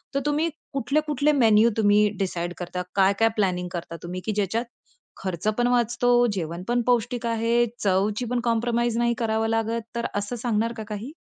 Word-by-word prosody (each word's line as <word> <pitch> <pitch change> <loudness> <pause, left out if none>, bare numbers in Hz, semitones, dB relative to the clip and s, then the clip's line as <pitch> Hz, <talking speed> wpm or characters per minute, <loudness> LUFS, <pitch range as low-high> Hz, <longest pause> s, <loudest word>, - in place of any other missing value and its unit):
तर - - +3
तुम्ही 300 +3 +1 0.2
कुठले-कुठले 295 +2 +1
मेनू 225 -5 +5
तुम्ही 210 -1 +4
डिसाईड 175 -2 -2
करता. 180 0 -4
काय-काय 200 +3 +4
प्लॅनिंग 180 -4 0
करता 170 -1 -5
तुम्ही 180 +1 -5
की 220 - 0
ज्याच्यात 210 +4 0 0.5
खर्चपण 210 +6 -1
वाचतो, 245 0 +3
जेवणपण 180 +7 -2
पौष्टिक 240 0 +1
आहे, 230 +1 +2
चवची 205 +4 +1
पण 250 - +1
कॉम्प्रोमाईज 235 0 +1
नाही 235 0 +2
करावं 225 -2 0
लागत. 225 +1 0
तर 235 - -2
असं 205 +4 -2
सांगणार 230 -1 -1
का 220 - -4
काही? 215 +7 -6
225 Hz, 155 wpm, -25 LUFS, 200-240 Hz, 0.5 s, मेनू